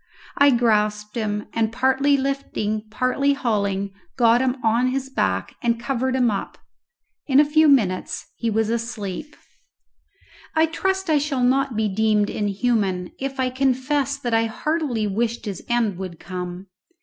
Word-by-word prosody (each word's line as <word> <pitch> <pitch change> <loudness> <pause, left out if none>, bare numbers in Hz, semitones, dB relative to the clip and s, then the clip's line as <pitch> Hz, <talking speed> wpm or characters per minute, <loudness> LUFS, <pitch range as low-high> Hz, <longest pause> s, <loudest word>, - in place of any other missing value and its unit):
I 285 0 +6
grasped 210 -4 +1
him, 210 -2 -2
and 225 -1 +1
partly 265 +3 +2
lifting, 225 -6 -2
partly 255 +5 +1
hauling, 200 -7 -1 0.3
got 235 -1 +5
him 260 0 0
on 230 +3 +3
his 265 +1 -2
back 95 - -1
and 235 -1 +1
covered 260 +1 -1
him 250 -3 +3
up. 200 - -4 0.7
In 270 -1 +5
a 300 - +6
few 310 +2 +4
minutes 215 -10 +2
he 230 - -2
was 220 0 +1
asleep. 230 +3 -4 1.2
I 320 0 +5
trust 380 +4 -1
I 300 - +4
shall 280 -3 -1
not 265 0 +2
be 220 0 +1
deemed 210 +1 +1
inhuman 200 -3 0
if 270 0 -4
I 255 -1 +1
confess 270 +2 0
that 245 -4 -3
I 225 0 +3
heartily 275 -2 -1
wished 230 +4 -1
his 200 -3 -5
end 225 -6 +1
would 185 -3 -6
come. 180 +1 -6
235 Hz, 150 wpm, -22 LUFS, 210-270 Hz, 1.2 s, I